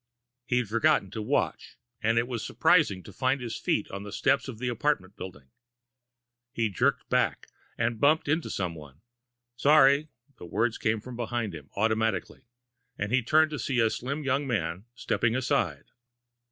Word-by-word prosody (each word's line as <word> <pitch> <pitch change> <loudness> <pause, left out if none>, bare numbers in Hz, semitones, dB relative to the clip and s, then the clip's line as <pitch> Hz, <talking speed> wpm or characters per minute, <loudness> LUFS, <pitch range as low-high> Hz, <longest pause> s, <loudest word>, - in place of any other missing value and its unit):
He'd 125 -2 +1
forgotten 105 -3 +2
to 110 - -4
watch, 105 - -1 0.2
and 115 +1 +3
was 120 -3 -4
surprised - - +3
to - - -11
find 130 +1 +1
his 120 -2 -5
feet - - 0
on 100 - -5
the 105 0 -8
steps - - +1
of 125 -5 -7
the 125 +2 -3
apartment 120 -6 -1
building. 75 -8 -10 1.0
He 115 -4 0
jerked 95 - 0
back, - - +1 0.3
and 115 -1 -1
bumped 150 +5 +3
into 155 +3 0
someone. 80 -5 -5 0.5
"Sorry." 140 +2 +5 0.3
The 90 - -9
words 110 +6 0
came 110 0 0
from 125 +2 -9
behind 120 -3 -3
him, 75 -3 -10
automatically, 110 0 -1 0.5
and 105 +1 -3
he 130 +1 +3
turned 155 +6 +3
to 150 - -4
see 125 +2 -1
the 115 -1 +3
slim 140 +5 -4
young 140 +1 0
man 90 -5 -2
stepping 120 -2 0
aside. 135 +2 0
115 Hz, 160 wpm, -28 LUFS, 105-130 Hz, 1.0 s, Sorry